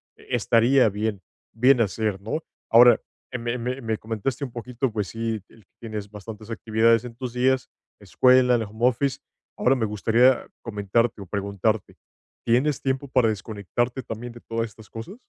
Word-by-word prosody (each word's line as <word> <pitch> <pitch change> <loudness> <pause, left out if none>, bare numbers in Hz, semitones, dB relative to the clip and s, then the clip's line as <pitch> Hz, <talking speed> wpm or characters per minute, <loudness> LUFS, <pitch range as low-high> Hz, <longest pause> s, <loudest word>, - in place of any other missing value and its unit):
estaría 120 +2 +3
bien 105 -1 -3 0.3
bien 125 +3 +4
hacer, 105 -1 -1
¿no? 115 +10 -3 0.3
Ahora, 120 +1 +7 0.3
me 120 0 -3
me 125 +2 -3
me 110 -1 -2
comentaste 115 +5 -3
un 130 - -4
poquito, 125 +2 -3
pues, 105 -3 -2
sí, 115 +2 -3
el 110 -4 -21
que - - -53
tienes 105 -3 -6
bastantes 105 +1 -9
actividades 115 +1 +2
en 115 -1 -8
tus 125 -1 -6
días, 130 +1 +1 0.3
escuela, 125 -1 +4
el 115 - 0
home 110 +3 0
office. 130 +2 0 0.4
Ahora 130 - +3
me 120 -4 0
gustaría 115 +5 +3
comentarte 110 0 0
o - - -7
preguntarte, 100 +2 -2 0.5
¿tienes 130 +4 +2
tiempo 135 +1 -1
para 125 -3 +3
desconectarte 110 +4 -3
también 115 +2 -6
de 120 - -11
todas 115 0 -2
estas 110 0 -16
cosas? 115 - -8
115 Hz, 160 wpm, -24 LUFS, 110-125 Hz, 0.5 s, Ahora